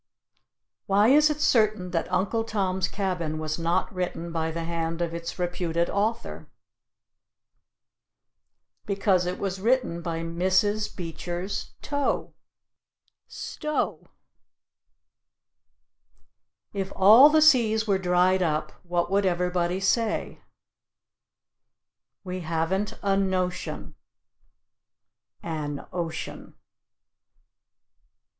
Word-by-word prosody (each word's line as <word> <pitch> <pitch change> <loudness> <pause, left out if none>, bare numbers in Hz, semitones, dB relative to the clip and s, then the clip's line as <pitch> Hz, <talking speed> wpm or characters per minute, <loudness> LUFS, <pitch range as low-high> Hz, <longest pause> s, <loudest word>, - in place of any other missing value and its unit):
Why 205 +3 +4
is 300 +3 +6
it 300 0 -2
certain 215 -8 +2
that 170 +1 -2
"Uncle 195 +5 0
Tom's 190 -4 -1
Cabin" 180 -6 -2
was 155 +1 -3
not 170 +6 0
written 175 -2 -4
by 160 -1 -1
the 165 +1 -4
hand 165 0 -3
of 170 -1 -2
its 170 0 -5
reputed 175 -1 -1
author? 215 +3 -2 2.4
Because 195 -3 +1
it 180 - -2
was 195 -1 -3
written 235 -7 +1
by 165 -1 -3
Mrs. 185 +5 0
Beecher's 175 +2 -5
toe 285 -2 -1 0.9
(Stowe). 305 0 -3 2.7
If 195 -1 -3
all 220 +9 +8
the 310 +1 +4
seas 235 -8 +4
were 200 -3 +1
dried 180 +1 +3
up, 155 -3 0
what 175 0 -1
would 200 0 +2
everybody 180 0 0
say? 220 +3 0 1.8
We 185 -1 -5
haven't 170 +4 -1
a 195 -1 +2
notion 185 -2 -2 1.5
(an 150 -3 -4
ocean). 170 -2 -5
185 Hz, 95 wpm, -26 LUFS, 170-205 Hz, 2.7 s, all